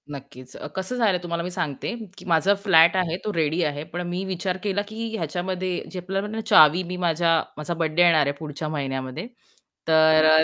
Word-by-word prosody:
नक्कीच. 135 -2 -10
अ, - - -7
कसं 190 +6 -3
झालं 215 -6 +2
तुम्हाला 170 -1 -3
मी 180 - -5
सांगते, 155 - -3 0.2
की - - -12
माझा 170 +2 +3
फ्लॅट 165 -3 +6
आहे 175 -2 0
तो 210 - -2
रेडी 160 0 0
आहे, 145 -1 -2
पण 175 +3 -6
मी 180 +2 -3
विचार 185 0 -3
केला, 205 -1 0
की 225 +2 -5
ह्याच्यामध्ये 180 +2 -3
जे 185 - -5
आपल्याला 195 +4 -4
चावी 155 +4 +6
मी 180 +1 -6
माझ्या 165 -1 +2 0.2
माझा 150 +3 -3
बर्थडे 165 0 0
येणार 165 -4 +5
आहे 140 - 0
पुढच्या 155 0 -5
महिन्यामध्ये 135 - -4 0.6
तर 160 -1 +5
अ, 155 0 +6
170 Hz, 190 wpm, -24 LUFS, 155-185 Hz, 0.6 s, फ्लॅट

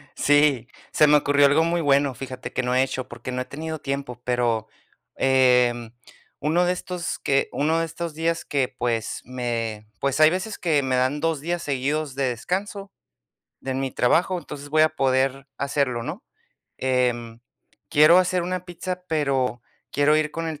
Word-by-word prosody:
Sí, 145 -4 +3 0.2
se 150 - +5
me 150 - +6
ocurrió 145 0 +4
algo 145 +3 +4
muy 170 +1 0
bueno, 140 -3 +2
fíjate, 130 0 -7
que - - -1
no 125 0 -1
he 130 - +4
hecho, 130 -1 -4
porque 130 - -7
no 125 0 -2
he - - -4
tenido 160 +3 -6
tiempo, 135 -4 -5
pero, 120 -3 0 0.5
em, 125 -3 +3 0.5
uno 170 +4 +2
de 180 - +2
estos 180 -1 -5
que 135 0 +1
uno 160 +3 +1
de 165 - 0
estos 165 0 -6
días 165 +1 -1
que, 135 -3 -1
pues, 115 -2 -2
me 115 -4 -4
pues, 140 +1 0
hay 155 0 +8
veces 190 +5 -3
que 155 -5 +1
me 130 -1 0
dan 130 +4 0
2 165 -2 0
días 170 +3 -3
seguidos 140 +1 -2
de 135 0 0
descanso 195 - -4 0.7
de 130 0 -4
mi 135 0 -2
trabajo, 175 +10 +2
entonces 145 -4 -9
voy 155 +1 +3
a 155 - +5
poder 135 -2 0
hacerlo, 140 -4 -1
¿no? - - -6 0.5
Em, 120 -3 -1 0.5
quiero 155 +4 +7
hacer 185 -1 +1
una 180 +1 -3
pizza, 180 0 -6
pero 135 -6 0 0.3
quiero 145 +2 +3
ir 155 -1 0
con 165 +1 -4
el 155 -2 -6
140 Hz, 175 wpm, -24 LUFS, 130-160 Hz, 0.7 s, hay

